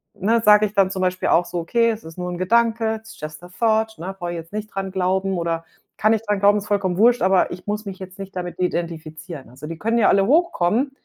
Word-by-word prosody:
ne, 225 +4 +1
sage 210 0 +7
ich 205 - -14
dann 195 -2 +3
zum 190 - -3
Beispiel 185 0 0
auch 175 - +4
so: 175 - -5
„Okay, 230 +7 +2
es 220 - -6
ist 160 +2 -11
nur 180 0 -3
'n 175 - -4
Gedanke, 225 +3 +2
it's 220 +1 -12
just 155 +1 -7
a - - -9
thought, 220 +2 0
ne, 185 +4 -6
brauche 175 0 -4
ich - - -4
jetzt 165 +4 -10
nicht 215 0 -4
dran 195 -1 -3
glauben 190 0 0
oder 165 -1 -2 0.3
kann 215 +1 +3
ich 220 - 0
dran 205 -2 0
glauben, 205 +1 +5
ist 205 - -9
vollkommen 190 -3 0
wurscht, 240 +3 +4
aber 190 -1 +3
ich 180 0 -8
muss 210 +1 -3
mich 190 -1 -6
jetzt 190 +1 -10
nicht 195 0 -8
damit 180 0 -5
identifizieren.“ 165 -4 -4
Also 130 +4 -11
die 165 0 -7
können 225 +2 0
ja 215 - +4
alle 195 0 +3
hochkommen, 270 - +2
195 Hz, 255 wpm, -22 LUFS, 175-220 Hz, 0.3 s, sage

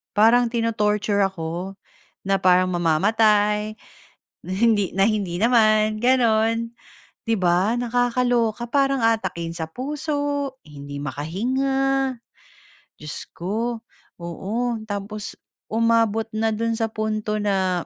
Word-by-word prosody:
Parang 235 +3 +5
ti-no-torture 210 -3 +1
ako, 180 +1 -5 0.5
na 195 0 +3
parang 185 0 +4
mamamatay, 210 +5 +2 0.7
na - - -7
hindi 205 0 +2
na 195 0 +4
hindi 200 -6 -1
naman 215 -2 +3
ganon, 230 -2 +2 0.5
'di 225 - +2
ba? 185 +5 +2
Nakakaloka, 245 -1 0
parang 275 -3 +2
aatakihin 185 -7 0
sa 160 -1 -4
puso, 285 - -2
hindi 145 -1 -8
makahinga. 265 - -1 0.8
Diyos 150 0 -7
ko, 225 +6 -3 0.4
oo. 180 +5 -5 0.3
Tapos 205 +1 -5 0.3
umabot 225 -1 +2
na 220 +1 +1
do'n 230 +1 -1
sa 225 -1 0
punto 215 -1 -2
na 190 -4 0
215 Hz, 105 wpm, -23 LUFS, 195-235 Hz, 0.8 s, Parang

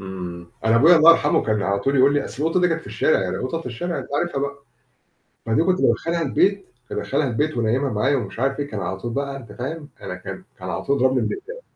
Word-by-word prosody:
إمم. 90 -3 -7 0.2
أنا 110 +1 +4
أبويا 165 +7 +7
الله 160 +1 +8
يرحمه 165 - +3
كان 110 -2 0
على 100 0 0
طول 135 +5 +1
يقول 135 +2 +5
لي 145 - +1
أصل 135 +5 -6
القطة 165 +3 +2
دي 180 - +4
كانت 165 0 -1
في - - -16
الشارع، 95 -11 +1
القطط 130 - -3
في - - -10
الشارع 170 +9 -3
أنت - - -6
عارفها 175 -3 -1
بقى. 140 0 -4 0.8
فدي 115 +8 +2
كنت 185 +1 +1
بادخلها 170 0 +1
البيت، 195 +7 +1 0.2
كنت - - -5
ادخلها 140 0 0
البيت 145 +3 -1
وأنيّمها 120 +5 +1
معايا 130 +7 +1
ومش 115 -3 -4
عارف 135 +2 0
إيه. 145 - -2
كان 105 -6 -5
على 95 +1 -3
طول 115 +4 -5
بقى 140 0 -2
أنت 115 -6 -12
فاهم، 145 +6 -6
أنا - - -5
كان - - -8 0.2
كان - - -6
على - - -3
طول 140 - +1
يضربني 130 -1 +2
بالأقلام. 485 +6 -6
140 Hz, 240 wpm, -22 LUFS, 115-160 Hz, 0.8 s, الله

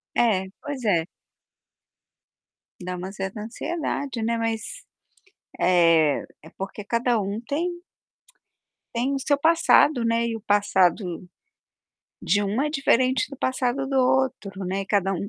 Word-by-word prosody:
É, 210 -6 +2 0.2
pois 285 -3 -6
é. 170 -6 +2 1.8
Dá 180 0 -4
uma 180 +2 -6
certa 195 +1 -5
ansiedade, 275 +1 -4
né, 230 +1 0
mas, 225 - -4 0.8
eh, 165 -4 +4 0.2
é 160 - -14
porque 195 +2 -6
cada 235 +1 +1
um 200 +2 -3
tem 345 +7 -3 1.1
tem 250 +4 0
o - - -2
seu 285 +2 +1
passado, 315 -4 +4
né, 230 0 +1
e 230 - -2
o 225 - -7
passado 190 -3 +1 0.9
de 205 - +1
um 205 +5 -1
é 300 - 0
diferente 260 -2 +2
do 275 - -8
passado 260 +1 -1
do 270 - -1
outro, 250 -7 +1
né, 190 +2 -2
e - - -10
cada 195 -1 +1
um 195 +2 -3
230 Hz, 135 wpm, -24 LUFS, 195-265 Hz, 1.8 s, eh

